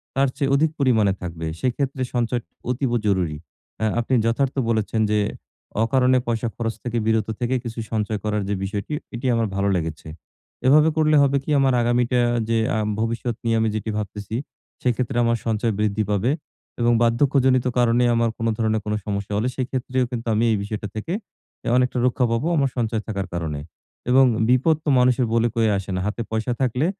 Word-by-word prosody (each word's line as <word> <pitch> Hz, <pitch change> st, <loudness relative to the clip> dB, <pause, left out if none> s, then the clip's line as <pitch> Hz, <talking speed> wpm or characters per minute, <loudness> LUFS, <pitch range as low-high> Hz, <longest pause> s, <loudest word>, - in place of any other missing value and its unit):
তার 135 Hz, 0 st, +3 dB
চেয়ে 140 Hz, -3 st, 0 dB
অধিক 155 Hz, +2 st, +2 dB
পরিমাণে 110 Hz, -8 st, +3 dB
থাকবে। 85 Hz, -2 st, -5 dB, 0.2 s
সেক্ষেত্রে 130 Hz, +1 st, -1 dB
সঞ্চয় 120 Hz, 0 st, 0 dB, 0.3 s
অতীব 125 Hz, 0 st, -1 dB
জরুরী। 90 Hz, -7 st, +1 dB, 0.5 s
আ -, -, +3 dB
আপনি 120 Hz, +2 st, -1 dB
যথার্থ 125 Hz, +4 st, +1 dB
বলেছেন 110 Hz, 0 st, 0 dB
যে, 105 Hz, -, +3 dB, 0.6 s
অকারণে 130 Hz, +2 st, +3 dB
পয়সা 120 Hz, 0 st, 0 dB
খরচ 115 Hz, -1 st, -2 dB
থেকে 120 Hz, -1 st, -2 dB
বিরত 110 Hz, -1 st, +1 dB
থেকে 125 Hz, +1 st, 0 dB
কিছু 115 Hz, -1 st, -6 dB
সঞ্চয় 110 Hz, -1 st, -1 dB
করার 105 Hz, -1 st, 0 dB
যে -, -, +1 dB
বিষয়টি 100 Hz, +8 st, -4 dB, 0.2 s
এটি 120 Hz, +3 st, -6 dB
আমার 115 Hz, -1 st, +1 dB
ভালো 100 Hz, 0 st, +1 dB
লেগেছে। 80 Hz, -3 st, -4 dB, 0.6 s
এভাবে 150 Hz, +4 st, +6 dB
করলে 155 Hz, -1 st, +4 dB
হবে 140 Hz, 0 st, +3 dB
কি -, -, -8 dB
আমার 135 Hz, -1 st, +3 dB
আগামীটা 120 Hz, +1 st, +2 dB, 0.3 s
যে, 115 Hz, -, +2 dB, 0.2 s
আ -, -, +1 dB, 0.2 s
ভবিষ্যৎ 115 Hz, +1 st, -1 dB
নিয়ে 115 Hz, -1 st, +1 dB
আমি 110 Hz, 0 st, +2 dB
যেটি 110 Hz, +1 st, -3 dB
ভাবতেছি 105 Hz, +1 st, -5 dB, 0.5 s
সেক্ষেত্রে 125 Hz, 0 st, 0 dB
আমার 115 Hz, 0 st, +2 dB
সঞ্চয় 110 Hz, 0 st, 0 dB
বৃদ্ধি 105 Hz, 0 st, +1 dB
পাবে 105 Hz, +5 st, +1 dB, 0.5 s
এবং 120 Hz, 0 st, +4 dB
বার্ধক্যজনিত 130 Hz, +1 st, +3 dB
কারণে 120 Hz, 0 st, +3 dB
আমার 115 Hz, 0 st, +2 dB
কোন 115 Hz, -, -1 dB
ধরনের 110 Hz, -1 st, +1 dB
কোন 105 Hz, -, -1 dB
সমস্যা 100 Hz, 0 st, -3 dB
হলে 110 Hz, +4 st, 0 dB
সেক্ষেত্রেও 130 Hz, 0 st, -1 dB
কিন্তু 120 Hz, -1 st, -4 dB
আমি 110 Hz, +2 st, +2 dB
এই 110 Hz, -, +2 dB
বিষয়টা 105 Hz, 0 st, -4 dB
থেকে 110 Hz, +11 st, -3 dB, 0.5 s
এ -, -, -4 dB
অনেকটা 125 Hz, 0 st, +1 dB
রক্ষা 125 Hz, 0 st, +2 dB
পাবো 115 Hz, +7 st, 0 dB
আমার 140 Hz, -3 st, +2 dB
সঞ্চয় 110 Hz, -2 st, 0 dB
থাকার 100 Hz, -3 st, -3 dB
কারণে 80 Hz, -4 st, -3 dB, 0.5 s
এবং 130 Hz, +1 st, +6 dB, 0.2 s
বিপদ 130 Hz, +6 st, +4 dB
তো -, -, +1 dB
মানুষের 125 Hz, 0 st, +3 dB
বলে 115 Hz, 0 st, +3 dB
কয়ে 115 Hz, -2 st, +3 dB
আসে 95 Hz, 0 st, -6 dB
না। -, -, -1 dB
হাতে 105 Hz, +3 st, -3 dB
পয়সা 110 Hz, +2 st, -1 dB
থাকলে 130 Hz, +3 st, +1 dB
115 Hz, 180 wpm, -23 LUFS, 110-125 Hz, 0.6 s, এভাবে